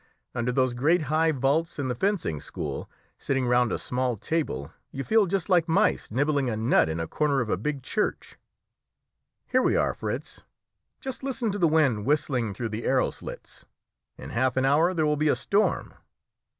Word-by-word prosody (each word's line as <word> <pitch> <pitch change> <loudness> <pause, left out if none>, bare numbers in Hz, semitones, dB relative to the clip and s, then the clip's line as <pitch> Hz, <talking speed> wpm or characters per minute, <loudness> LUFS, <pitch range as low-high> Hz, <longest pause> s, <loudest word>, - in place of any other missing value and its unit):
Under 120 +1 -1
those 130 -1 +1
great 155 +7 +2
high 160 +1 +3
vaults 145 +4 0
in 140 -3 -2
the 125 - 0
fencing 155 - -1
school, - - -5 0.3
sitting 135 -2 0
round 125 -1 +3
a - - 0
small 125 -2 -1
table, 95 - -2 0.2
you 135 - -4
feel 220 +2 +3
just 185 -1 -1
like 175 -3 +3
mice 165 - +2
nibbling 140 +2 +1
a 110 - -2
nut 110 -7 +3
in 80 +1 -3
a 80 - -1
corner 145 - +1
of 120 -4 -1
a - - +3
big 135 +7 -3
church. 210 - -2 1.1
Here 255 0 +2
we - - +2
are, - - +2
Fritz. - - -5 0.6
Just 265 -2 -5
listen 260 -4 -1
to 205 - -4
the 170 - +4
wind 145 -9 +2
whistling 130 -8 0
through 115 -2 -3
the 110 +2 -5
arrow 130 -1 +2
slits. - - -10 0.5
In - - -9
half 130 +2 0
an 130 - +3
hour 160 +7 +3
there 160 -2 +2
will 150 0 +1
be 155 +1 +2
a - - +3
storm." 205 +2 0
140 Hz, 190 wpm, -26 LUFS, 120-165 Hz, 1.1 s, the